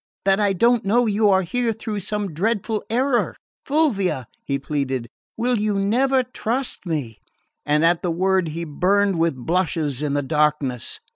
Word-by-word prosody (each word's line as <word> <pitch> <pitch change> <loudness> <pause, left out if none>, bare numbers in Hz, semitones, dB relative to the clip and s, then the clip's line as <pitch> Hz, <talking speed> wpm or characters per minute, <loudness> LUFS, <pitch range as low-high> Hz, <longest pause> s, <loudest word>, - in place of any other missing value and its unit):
That 195 0 +4
I 205 -2 +2
don't 235 +5 +3
know 235 +5 +3
you 210 -1 +2
are 190 -1 +4
here 235 +5 -1
through 220 -1 -4
some 205 -2 -3
dreadful 215 +4 -1
error? 250 +2 +1 0.3
Fulvia," 220 - +1 0.2
he 140 - -1
pleaded, 135 -4 -2 0.3
"will 240 0 +1
you 210 -1 0
never 255 +7 +2
trust 245 -3 -3
me?" 140 -10 -3 0.5
And 150 +2 +3
at 170 0 +3
the 180 - -1
word 185 +1 +1
he 165 +2 -4
burned 185 +4 +1
with 165 -3 +2
blushes 155 -1 -1
in 145 -2 -1
the 145 - 0
darkness. 150 -4 0
190 Hz, 160 wpm, -22 LUFS, 150-225 Hz, 0.5 s, That